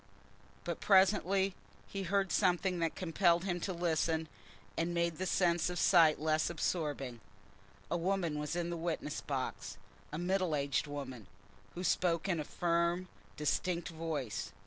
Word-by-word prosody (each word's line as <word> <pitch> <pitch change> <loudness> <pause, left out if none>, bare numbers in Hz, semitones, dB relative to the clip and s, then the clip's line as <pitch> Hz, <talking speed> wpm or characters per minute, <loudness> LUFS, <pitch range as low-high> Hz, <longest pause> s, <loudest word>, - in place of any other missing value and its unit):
But - - -3
presently 195 0 +4 0.3
he 195 - -5
heard 195 +1 0
something 180 -1 +2
that 165 -1 0
compelled 170 0 +2
him 175 -2 -1
to 190 - -2
listen, 165 -2 0 0.5
and 170 +1 -1
made 170 -1 0
the 185 - -1
sense 175 -2 +2
of 180 - -4
sight 165 -5 +5
less 155 +1 +1
absorbing. 145 -7 -2 0.7
A 170 - +2
woman 170 -3 0
was 150 +2 -3
in 175 0 -1
the 170 - -3
witness 165 -3 -3
box, 130 -7 -4 0.3
a 150 - -4
middle 180 -1 +1
aged 140 0 0
woman, 130 -7 -6 0.5
who 180 - -4
spoke 175 -1 +1
in 175 -4 +1
a - - -1
firm 170 +3 0 0.3
distinct 170 +3 0
voice. 160 -8 -4
170 Hz, 145 wpm, -34 LUFS, 155-180 Hz, 0.7 s, sight